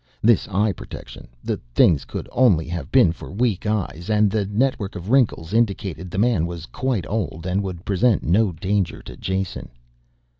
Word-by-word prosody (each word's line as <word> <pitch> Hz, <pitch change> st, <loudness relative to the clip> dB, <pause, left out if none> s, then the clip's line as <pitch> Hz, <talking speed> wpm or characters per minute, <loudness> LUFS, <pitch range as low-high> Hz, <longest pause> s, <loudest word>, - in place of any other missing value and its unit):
This 115 Hz, -1 st, +4 dB
eye 105 Hz, +2 st, +1 dB
protection, -, -, -10 dB, 0.2 s
the -, -, -1 dB, 0.2 s
things 75 Hz, -5 st, +4 dB
could -, -, -6 dB
only 100 Hz, -12 st, +3 dB
have 85 Hz, -5 st, -5 dB
been -, -, +5 dB
for 85 Hz, -, -9 dB
weak 105 Hz, 0 st, 0 dB
eyes, 100 Hz, -4 st, -2 dB
and 105 Hz, -1 st, +3 dB
the 105 Hz, -2 st, 0 dB
network 105 Hz, -1 st, 0 dB
of 90 Hz, +4 st, -5 dB
wrinkles 110 Hz, -9 st, +2 dB
indicated 95 Hz, -6 st, 0 dB
the 95 Hz, -, -6 dB
man 105 Hz, -6 st, +2 dB
was 85 Hz, -1 st, -6 dB
quite 130 Hz, -4 st, -2 dB
old 90 Hz, -6 st, -3 dB
and 95 Hz, +2 st, 0 dB
would 95 Hz, -2 st, -6 dB
present 105 Hz, +2 st, +2 dB
no 100 Hz, +4 st, +3 dB
danger 95 Hz, +2 st, -1 dB
to -, -, -10 dB
Jason. 95 Hz, -1 st, -3 dB
100 Hz, 175 wpm, -22 LUFS, 85-110 Hz, 0.2 s, been